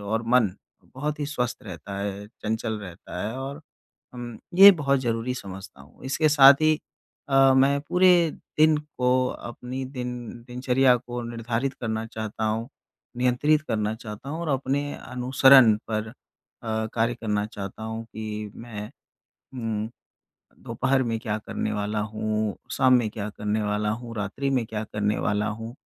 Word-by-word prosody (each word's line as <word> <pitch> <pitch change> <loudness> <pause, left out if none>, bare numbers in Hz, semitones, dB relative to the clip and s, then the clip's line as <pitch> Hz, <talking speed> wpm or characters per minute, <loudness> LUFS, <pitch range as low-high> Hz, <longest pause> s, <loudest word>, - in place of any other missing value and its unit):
और 110 +3 -2
मन 120 -4 +4 0.4
बहुत 150 +3 -3
ही 145 - -1
स्वस्थ 125 -4 -3
रहता 100 0 -7
है, 100 0 -4
चंचल 110 0 -3
रहता 90 -1 -8
है 115 - -5
और 140 +3 -6 0.5
हम 120 -2 -7 0.2
ये 195 +3 +11
बहुत 140 -6 +1
ज़रूरी 120 0 -1
समझता 95 - -9
हूँ। 70 - -18
इसके 155 +4 +2
साथ 140 -2 +9
ही 155 -1 +4 0.5
अ, 135 -1 +5
मैं 140 +2 +4
पूरे 180 +1 +4 0.3
दिन 155 0 +6
को 130 -4 0
अपनी 125 +3 -6
दिन 125 -2 -5 0.4
दिनचर्या 125 +1 +3
को 120 0 -6
निर्धारित 120 +3 -2
करना 110 -1 -2
चाहता 110 -1 -5
हूँ, 110 +2 -1 0.5
नियंत्रित 125 +5 +2
करना 105 0 0
चाहता 110 +2 -9
हूँ 155 +4 -4
और 170 - -3
अपने 140 +1 0
अनुसरण 130 -1 +5 0.2
पर 110 0 -2
अ, - - -10 0.8
कार्य 115 +1 +1
करना 105 -3 -1
चाहता 100 0 -7
हूँ 110 +1 -5
कि 110 -1 -6
मैं, 110 -3 -8 0.6
उम, 110 -3 -3 0.8
दोपहर 130 +3 +1
में 115 -2 -1
क्या 105 -1 -2
करने 105 - -2
वाला 105 +1 -1
हूँ, 110 0 -2 0.2
शाम 130 - +4
में 120 -3 +3
क्या 105 -1 -5
करने 105 +1 -1
वाला 105 0 0
हूँ, 115 +1 -5
रात्रि 110 +7 -2
में 130 -3 +1
क्या 110 0 -4
करने 105 0 0
वाला 105 0 0
हूँ? 115 +2 -6
115 Hz, 155 wpm, -25 LUFS, 105-130 Hz, 0.8 s, ये